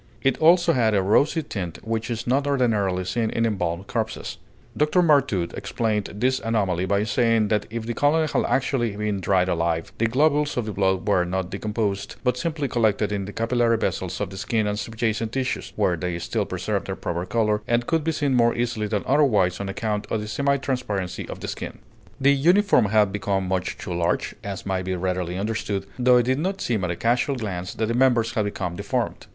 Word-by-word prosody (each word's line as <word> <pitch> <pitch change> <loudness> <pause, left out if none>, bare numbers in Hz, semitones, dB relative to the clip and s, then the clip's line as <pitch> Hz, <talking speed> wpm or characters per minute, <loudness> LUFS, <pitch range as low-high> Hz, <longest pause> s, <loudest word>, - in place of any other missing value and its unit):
It 135 -2 +2
also 170 +1 +5
had 115 -5 +2
a 100 - +3
rosy 145 - +3
tint 90 - -5
which 115 +1 -2
is 115 -2 -3
not 140 +3 +1
ordinarily 105 -9 +1
seen 110 +4 -1
in 115 +1 0
embalmed 90 -4 -1
corpses. - - -4 0.4
Dr. 150 +4 +3
Martout 140 - +2
explained 105 -3 -2
this 130 +5 +1
anomaly 95 -5 0
by 100 +1 +2
saying 115 -1 +2
that 105 -1 0
if 115 0 -5
the 120 - -2
colonel 150 +5 +2
had 155 - -1
actually 125 -5 0
been 105 -2 -2
dried 95 -1 +2
alive, 85 -2 -1
the 115 - +3
globules 145 +4 +2
of 120 - 0
the 110 - -3
blood 95 0 0
were 95 -3 +3
not 95 +1 -3
decomposed, 105 -1 -2
but 125 -2 +2
simply 155 +1 -2
collected 110 -4 +1
in 100 -2 -2
the 100 - -7
capillary 115 +1 +1
vessels 95 -4 -2
of - - -3
the 95 - -8
skin 110 +2 0
and 105 0 -1
subjacent 110 0 -2
tissues, 130 -1 -2
where 90 - +2
they 85 +1 -3
still 85 - -2
preserved - - -2
their - - -3
proper 85 0 -3
color, 105 0 +1
and 120 0 +1
could 160 +2 0
be 165 - +1
seen 145 -3 0
more 120 -1 +3
easily 120 -3 -1
than 105 -1 -1
otherwise 110 -11 +3
on 100 -1 -4
account 105 +1 -2
of 110 - 0
the 105 - -5
semi 140 +5 +1
transparency 105 -9 -3
of - - -7
the - - -5
skin. - - -6 0.4
The 140 +1 +5
uniform 175 - +4
had 105 -1 +3
become 95 -1 -1
much 95 -1 -2
too 90 - -5
large, 85 0 0
as 100 -2 -5
may 95 -1 -1
be 95 0 -2
readily 90 -1 -2
understood, 100 -1 -2
though 125 0 +5
it 120 - +4
did 130 +2 +1
not 190 +4 -2
seem 110 -5 -1
at 90 - -1
a 85 - -1
casual 120 - +1
glance 90 -7 -4
that 110 - 0
the 115 - -1
members 120 -2 +3
had 110 -4 0
become 90 -4 -3
deformed. - - -3
110 Hz, 210 wpm, -24 LUFS, 95-125 Hz, 0.4 s, also